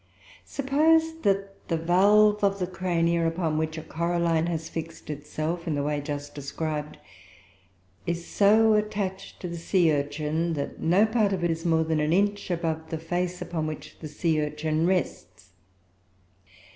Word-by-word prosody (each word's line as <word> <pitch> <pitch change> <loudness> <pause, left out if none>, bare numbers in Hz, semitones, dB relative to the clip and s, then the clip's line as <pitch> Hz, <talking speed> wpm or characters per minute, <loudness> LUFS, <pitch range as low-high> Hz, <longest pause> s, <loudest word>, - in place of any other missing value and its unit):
Suppose 320 +4 +2
that 195 -1 -1
the 165 - 0
valve 205 +5 +4
of 200 0 +3
the 185 - -1
Cronia 170 -2 0
upon 165 -2 -1
which 160 0 -2
a 160 - -5
coralline 170 0 0
has 165 -2 -3
fixed 165 -1 -6
itself 155 +4 -4
in 155 - 0
the 145 - -1
way 145 0 -1
just 145 0 -5
described, 150 +1 -4 1.1
is 170 0 -2
so 220 +2 +4
attached 205 -2 -2
to 180 - -4
the 170 0 -5
sea 170 -2 +3
urchin 150 +3 -1
that 145 -2 -4
no 180 +6 +4
part 220 -3 +1
of 180 -2 -2
it 175 - +2
is 165 +1 -4
more 160 -1 +3
than 160 -1 0
an 150 +2 +1
inch 205 +2 +1
above 160 -2 -2
the 160 - -3
face 175 +2 -2
upon 165 -3 -3
which 155 -1 -8
the 155 - -6
sea 155 +1 0
urchin 155 +2 -1
rests. 185 - -2
170 Hz, 160 wpm, -26 LUFS, 155-190 Hz, 1.1 s, valve